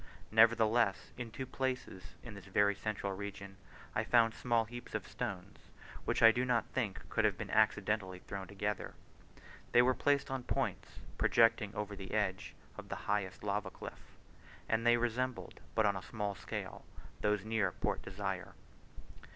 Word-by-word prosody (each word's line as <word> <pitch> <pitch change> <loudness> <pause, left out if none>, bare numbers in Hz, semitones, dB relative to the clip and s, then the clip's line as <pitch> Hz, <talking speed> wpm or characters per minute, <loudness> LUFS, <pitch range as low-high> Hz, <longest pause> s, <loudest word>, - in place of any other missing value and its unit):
Nevertheless, 115 -2 +4
in 120 -2 -5
two 130 +4 -5
places 130 -7 -4
in 120 - -8
this 100 -2 -10
very 100 +1 +3
central 100 -1 -3
region, 100 0 -7 0.4
I - - +1
found 115 -2 +4
small 115 -2 +1
heaps 120 +2 -8
of - - -3
stones, 95 0 -5 0.5
which - - +1
I 115 - +11
do 125 +2 0
not 125 -2 +2
think 110 -7 -2
could - - +1
have - - +3
been - - -5
accidentally 105 -3 +2
thrown 95 +1 -7
together. 100 +1 -3 0.8
They 120 - +8
were 130 +1 +4
placed 140 +2 +1
on 135 -1 -1
points, - - -3 0.2
projecting 115 -3 +4
over 105 -1 -3
the 95 +1 -6
edge 95 -3 -1 0.2
of - - -10
the - - -2
highest 100 -2 -1
lava 100 -1 -1
cliff, - - -11 0.5
and 115 +1 +1
they 120 0 +6
resembled, 120 +1 -2 0.2
but 110 - +4
on 100 -1 +3
a 95 - -4
small 105 +2 -3
scale, - - -6 0.4
those 105 -1 +1
near 110 -2 +1
Port - - -2
Desire. - - -4
105 Hz, 160 wpm, -34 LUFS, 100-120 Hz, 0.8 s, I